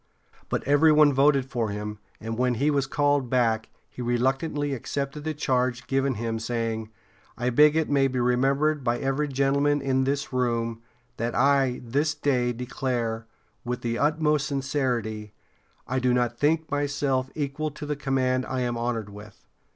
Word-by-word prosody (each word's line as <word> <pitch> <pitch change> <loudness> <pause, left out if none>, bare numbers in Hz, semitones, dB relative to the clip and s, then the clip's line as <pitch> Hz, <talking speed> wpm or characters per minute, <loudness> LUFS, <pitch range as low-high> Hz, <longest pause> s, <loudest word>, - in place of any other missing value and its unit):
But - - -1
every 145 +3 +5
one 150 -1 +6
voted 135 0 +4
for 120 -4 -2
him, 105 +1 -5 0.2
and 115 +1 -4
when 125 +1 +1
he 145 +6 +2
was 140 -2 0
called 145 -2 +1
back 115 -3 +1 0.2
he - - -9
reluctantly 135 +4 0
accepted 140 +3 -4
the 155 0 -3
charge 125 -4 0
given 135 -1 0
him, 115 +1 -3
saying: 115 -1 -3 0.5
"I 125 +1 0
beg 150 +4 +5
it 160 -1 +1
may 140 -1 +3
be 130 -1 -2
remembered 135 +4 +2
by 120 -1 +1
every 135 +3 -1
gentleman 140 +1 +2
in 130 -1 +1
this 140 0 -2
room 115 -2 -1 0.4
that 115 +1 -2
I 135 -2 +3
this 145 +6 0
day 130 -4 +1
declare, 120 -2 -3 0.4
with 125 0 -3
the 115 0 -2
utmost 150 -1 +2
sincerity, 125 -7 -2 0.5
I 130 +1 0
do 125 -1 +2
not 120 -1 0
think 155 +4 +1
myself 145 -2 0
equal 150 +1 -2
to 150 0 -8
the 150 0 -2
command 130 -2 0
I 130 -1 -2
am 120 -1 -1
honored 115 -3 -2
with." 105 +1 -13
130 Hz, 165 wpm, -26 LUFS, 120-145 Hz, 0.5 s, one